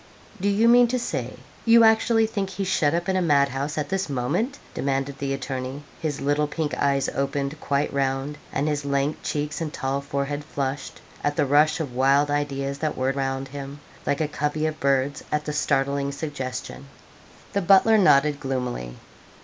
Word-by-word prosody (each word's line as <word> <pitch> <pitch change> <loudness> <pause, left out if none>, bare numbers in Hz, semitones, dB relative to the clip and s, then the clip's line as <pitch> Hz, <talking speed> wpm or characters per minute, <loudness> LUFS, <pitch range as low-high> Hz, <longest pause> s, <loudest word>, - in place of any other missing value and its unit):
'Do 200 - +2
you 210 +3 +3
mean 240 +1 +7
to 250 +2 0
say 135 - -3 0.3
you 230 0 +6
actually 225 0 +4
think 205 -3 -2
he's 190 0 -3
shut 155 -4 +2
up 170 0 -2
in 190 - +1
a 185 - +2
madhouse 140 -2 +1
at 150 -2 -2
this 190 -2 -1
moment?' 165 - -1 0.2
demanded 135 0 -1
the 140 -1 -2
attorney; 135 +1 -4 0.2
his 150 -3 -2
little 145 +1 +1
pink 150 0 -3
eyes 140 -1 +2
opened 140 +2 -2
quite 140 0 0
round, 135 +1 -1
and 140 +2 -1
his 145 -1 -1
lank 140 +1 0
cheeks 150 +2 -3
and 155 -2 -2
tall 135 0 -2
forehead 140 +1 -3
flushed, 140 -2 -4 0.2
at 145 0 0
the 150 - +2
rush 150 +4 +4
of 145 -6 -4
wild 140 +3 +3
ideas 140 -1 -2
that 155 -1 -2
whirred 130 +1 0
round 135 0 -2
him, 140 +1 -7 0.3
like 140 - +1
a 155 - +1
covey 150 +1 -1
of 155 0 -2
birds 140 +1 +1
at 150 0 0
the 150 - -3
startling 140 -1 0
suggestion. 140 -2 -5 0.7
The 200 - +1
butler 195 +4 +5
nodded 150 -6 +4
gloomily. 125 - -3
145 Hz, 180 wpm, -24 LUFS, 135-155 Hz, 0.7 s, mean